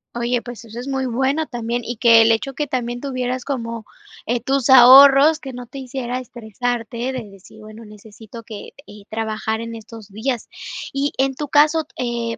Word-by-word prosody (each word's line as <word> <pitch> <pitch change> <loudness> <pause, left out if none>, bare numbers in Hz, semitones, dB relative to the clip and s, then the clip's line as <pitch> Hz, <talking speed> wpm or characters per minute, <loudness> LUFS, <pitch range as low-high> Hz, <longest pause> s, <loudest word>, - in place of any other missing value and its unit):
Oye, 240 0 -1
pues, 240 -1 -9
eso 230 +1 -10
es 250 - -7
muy 265 -1 -2
bueno 265 +6 -1
también, 240 -1 -3
y 235 +1 -6
que 230 -1 +6
el 225 0 +4
hecho 270 +5 -1
que 295 +2 -3
también 245 -2 -3
tuvieras 255 -2 -3
como, 230 -5 -4 0.4
eh, 240 +2 0
tus 270 +1 -1
ahorros, 275 +4 +8
que 270 -4 -9
no 245 0 -8
te 250 +3 -10
hiciera 255 -1 -5
estresarte, 240 0 -5
de 245 -5 -6
decir: 195 +2 -17
"Bueno 215 +1 -12
necesito 215 +2 -13
que, 215 -1 -10
eh, 210 0 -14
trabajar 220 0 -3
en 230 0 -6
estos 225 -1 -11
días", 225 +4 -4 0.4
¿y 280 +1 -1
en 270 0 +1
tu 295 +3 -5
caso, 300 +2 +3
eh, 235 -2 -3
240 Hz, 185 wpm, -20 LUFS, 225-265 Hz, 0.4 s, ahorros